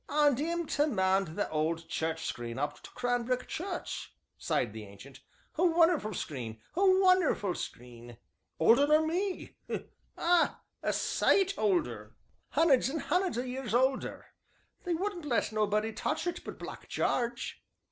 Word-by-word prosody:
"And 290 -3 +3
'im 340 +3 -1
to 295 0 +1
mend 190 - +1
th' 205 - 0
owd 160 +2 -1
church 160 0 -2
screen 120 0 -4
up 145 +2 -3
to - - -11
Cranbrook 245 0 -1
Church," 360 +1 -5 0.2
sighed 115 -4 -1
the 110 -1 -7
Ancient; 100 +7 -13 0.4
"a - - +4
wunnerful 330 - +3
screen, 120 -10 -5 0.2
a 375 - +2
wunnerful 370 - +4
screen! 120 -4 -8 0.4
older 235 - +6
nor 305 +1 +4
me 365 +4 -2 0.6
ah! 345 0 +3 0.2
a - - 0
sight 390 0 +2
older 120 - 0 0.4
hunneds 280 -5 +4
and 310 +2 -2
hunneds 360 -8 +1
o' 245 - 0
years 255 -2 -3
older 260 +2 +1 0.6
they 350 -1 +1
wouldn't 365 -2 -3
let 240 -6 +1
nobody 215 +1 +1
touch - - -2
it 350 - -3
but - - -7
Black - - -9
Jarge." 240 -1 -1
245 Hz, 145 wpm, -31 LUFS, -, 0.6 s, older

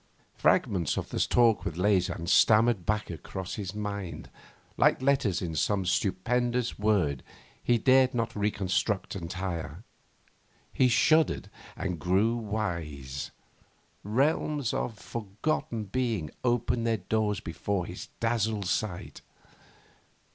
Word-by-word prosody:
Fragments 90 -6 +2
of - - -3
that - - 0
talk 115 -3 +4
with 80 - -4
Leysin 90 -3 +1
stammered 110 +1 +4
back 105 -3 0
across 95 +3 -6
his 100 -2 -5
mind, 100 -3 -5 0.4
like - - +4
letters 130 -9 +1
in 85 -2 -3
some 95 +5 0
stupendous 120 +7 0
word 95 - +1 0.4
he 120 - +3
dared 130 +2 +4
not 115 -1 -1
reconstruct 100 -1 -1
entire. 90 -1 -5 0.9
He 130 - +4
shuddered 155 +6 +3 0.3
and 90 -4 -3
grew 95 +8 +2
wise. 85 - -4 0.7
Realms 140 +3 +1
of 115 - -2
forgotten 110 +2 -3
being 110 -7 -2
opened 120 -1 +1
their 115 -1 +2
doors 105 +2 0
before 90 +2 -3
his 90 - -8
dazzled 110 -3 0
sight. 90 0 -3
105 Hz, 110 wpm, -28 LUFS, 90-115 Hz, 0.9 s, talk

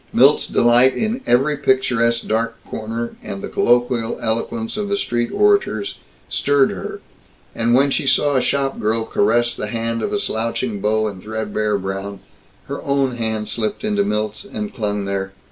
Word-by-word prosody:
Milt's - - +5
delight 120 +2 +4
in 225 +4 -1
every 135 +5 +3
picturesque 125 -4 +1
dark 115 +1 0
corner, 115 +2 -5
and 100 0 -6
the - - -3
colloquial 120 -1 +1
eloquence 225 - -2
of 205 -1 -3
the 200 - +1
street 120 -9 -1
orators, 200 - +2 0.3
stirred 140 -1 +2
her. - - -6 0.5
And 115 +1 +2
when 140 +2 +4
she 140 - 0
saw 145 +1 +3
a 130 - +3
shopgirl 120 -6 0
caress 120 +3 +2
the 105 - -4
hand 115 +1 -2
of - - -2
a - - +1
slouching 115 - -2
beau 110 +1 +1
in 100 -3 -7
threadbare 110 -1 -1
brown, 95 +1 -5 0.5
her - - -5
own 135 -3 0
hand 110 -2 -2
slipped 110 - -2
into 210 -1 +1
Milt's 110 - -2
and 210 +1 -5
clung 105 -3 -2
there. 95 0 -3
115 Hz, 160 wpm, -20 LUFS, 110-135 Hz, 0.5 s, Milt's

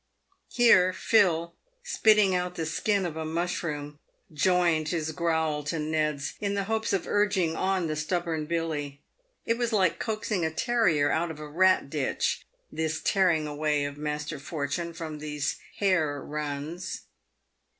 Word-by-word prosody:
Here 185 -7 +5
Phil, 170 -5 +2 0.3
spitting 215 - +4
out 180 0 -1
the 165 - -2
skin 195 +4 0
of 165 -3 -4
a 160 - -3
mushroom, 155 -3 -3 0.3
joined 170 -1 +2
his 160 -2 -1
growl 160 -2 0
to 165 +2 -2
Ned's, 150 -2 -1
in 200 -1 -1
the 200 - 0
hopes 220 +2 -1
of 195 -3 0
urging 195 -5 +1
on 190 -1 0
the 155 -1 -2
stubborn 160 -1 -2
Billy. 150 -4 -2 0.5
It 230 +1 0
was 240 -1 0
like 190 -6 +2
coaxing 215 -4 -2
a 160 - +1
terrier 170 - +2
out 165 +2 0
of 160 - -7
a 150 - -7
rat 185 +2 +3
ditch 145 -4 -1 0.2
this 160 0 -2
tearing 175 -6 +2
away 150 -1 0
of 145 0 -6
Master 150 0 -3
For 150 0 -4
tune 170 +4 -3
from 155 -2 -6
these 150 -1 -2 0.2
hare 160 -8 +1
runs. 150 +4 -5
165 Hz, 150 wpm, -27 LUFS, 150-185 Hz, 0.5 s, Here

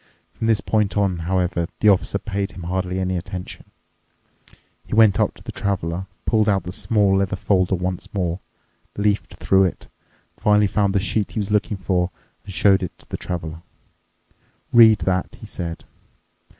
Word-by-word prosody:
From 115 - -3
this 110 -2 +3
point 105 -2 0
on, 95 -4 +1
however, 90 -2 0
the 105 - +5
Officer 100 0 +2
paid 100 -2 -3
him 90 -2 -9
hardly 90 +1 -2
any 95 0 -1
attention. 90 0 -7 1.2
He - - -4
went 110 -3 +5
up - - +1
to - - -15
the - - -6
Traveler, 95 -2 -2 0.2
pulled 110 -2 +2
out 95 -3 +2
the 90 - -6
small 100 0 +2
leather 95 -1 0
folder 95 -1 +1
once 90 0 -4
more, 90 -4 -2 0.6
leafed 105 0 0
through 95 0 +3
it, 90 - -4 0.5
finally 105 0 +3
found 100 0 +1
the - - +4
sheet 100 +2 -1
he 115 - -2
was 105 0 -3
looking 105 0 +1
for, 90 -1 0 0.3
and 100 - -9
showed 95 +1 +4
it 90 - -5
to - - -20
the - - -4
Traveler. 80 -2 -5 1.1
"Read 110 -2 +8
that," 95 -1 -1
he - - -10
said. 85 -2 -6
95 Hz, 170 wpm, -22 LUFS, 90-105 Hz, 1.2 s, Read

